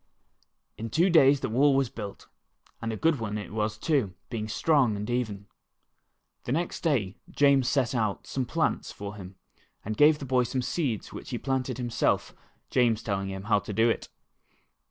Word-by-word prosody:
In 115 +1 -4
two 170 - +3
days 140 -4 +6
the - - -2
wall 135 +5 +4
was 135 -3 +1
built, 100 -3 -8 0.5
and 115 -1 -2
a 110 - -4
good 160 0 +2
one 105 -2 -3
it 105 -2 -7
was 105 0 -1
too, 125 - 0 0.2
being 110 -3 -3
strong 125 +1 +2
and 105 +1 -4
even. 105 -5 -2 1.0
The - - -3
next 165 +5 -1
day 120 - 0
James 140 -3 +3
set 135 -4 +1
out 110 -5 -1
some 130 -2 -2
plants 160 +6 -1
for 100 0 -7
him, 95 -2 -10 0.5
and 110 +1 -3
gave 150 +3 +6
the 140 - -7
boy 130 -1 +2
some 125 +1 -1
seeds 125 - -2
which - - -8
he - - -2
planted 130 -2 -2
himself, 120 -2 0 0.4
James 120 -3 +2
telling 100 -2 -2
him 95 0 -6
how 105 0 +3
to 105 - -7
do 115 +3 +4
it. - - -4
120 Hz, 180 wpm, -28 LUFS, 105-135 Hz, 1.0 s, days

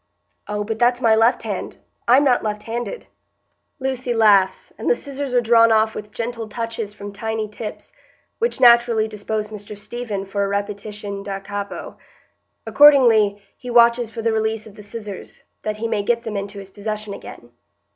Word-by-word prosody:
"Oh, 210 0 -2
but 220 +1 -4
that's 245 0 +3
my 230 -3 +4
left 225 +3 +3
hand; - - -5 0.3
I'm 255 +4 +6
not 255 -4 +3
left 210 -1 -3
handed." 240 - -5 0.7
Lucy 255 -2 -2
laughs, 205 -4 +3
and - - -1
the - - +4
scissors 280 - -5
are 245 - +5
drawn 230 0 +5
off 220 0 +3
with 210 0 -8
gentle 230 -1 -4
touches 225 -1 -4
from 205 -1 -9
tiny 220 +1 -3
tips, 210 +1 -8 0.5
which 470 - 0
naturally 235 -3 +5
dispose 210 0 -4
Mr 210 0 -9
Stephen 210 -2 -5
for 200 +1 -2
a - - 0
repetition 205 0 -4
da 195 -1 -5
capo. 200 +1 -6 0.7
Accordingly, 230 -9 +5
he 250 - -9
watches 235 -1 +4
for 225 0 -7
the 225 0 +1
release 220 0 -1
of 215 - -13
the 210 - -12
scissors, 205 -2 -9 0.2
that 215 0 -3
he 230 +2 -2
may 220 -2 0
get 235 +3 0
them 220 -3 -5
into 200 0 -5
his 195 -1 -9
possession 215 0 -5
again. 120 -10 -11
220 Hz, 175 wpm, -21 LUFS, 205-235 Hz, 0.7 s, I'm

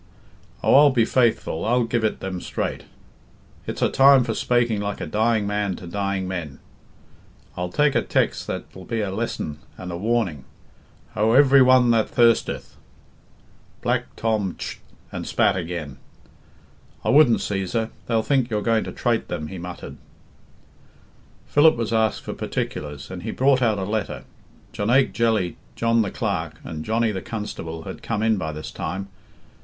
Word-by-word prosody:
Oh, - - +4
I'll 145 +2 +8
be 120 -4 +3
faithful, 115 -10 +1
I'll 120 +3 +2
give 115 0 -1
it 110 - -1
them 95 -2 -4
straight, - - -4 0.8
it's - - -3
a - - +3
time 135 -1 +6
for - - -2
spaking 120 -4 +1
like 100 0 -3
a - - -3
dying 110 0 +1
man 100 -2 -1
to 90 - -10
dying 100 +1 -2
men; 85 -7 -5 1.0
I'll 90 0 -3
take 145 +9 +2
a - - +2
tex' - - 0
that'll 95 -1 -7
be 115 -2 -2
a 100 -2 -2
lesson 75 -5 -3 0.2
and 90 -1 -7
a 85 - -4
warning, 100 - -1 0.7
'Ho, 110 +2 +2
every 140 0 +7
one 130 -1 +6
that 115 -2 +2
thirsteth 115 -1 +2 0.5
" - - -31
Black - - -1
Tom 110 -5 -1
tsht - - -6 0.3
and - - -5
spat - - +2
again. 85 -6 -5 1.1
"I - - -1
wouldn't, 135 -4 +6
Cæsar; 105 +3 -2 0.2
they'll 115 -2 +1
think 130 -2 +1
you're 105 -2 -1
going 115 -1 +2
to - - -5
trate 120 -2 -1
them," 75 -3 -4
he 95 - -7
muttered. 90 +1 -8 1.5
Philip 155 +2 +5
was 115 -1 -2
asked 110 -1 +1
for - - -5
particulars, 75 +1 -5
and 90 -1 -6
he 110 - -5
brought 130 +2 +3
out 110 -4 +2
a 95 - -2
letter. 105 +1 -3 0.5
Jonaique 125 +6 +2
Jelly, 110 -6 +1 0.2
John 115 0 +2
the 105 - -1
Clerk, 90 -10 -3
and 80 -2 -6
Johnny 115 +3 +1
the 95 -2 -4
Constable 80 -7 -6
had - - -8
come 110 -2 -2
in 110 -1 +3
by 80 -4 -3
this 75 0 -7
time. 95 +1 -4
110 Hz, 165 wpm, -23 LUFS, 95-120 Hz, 1.5 s, I'll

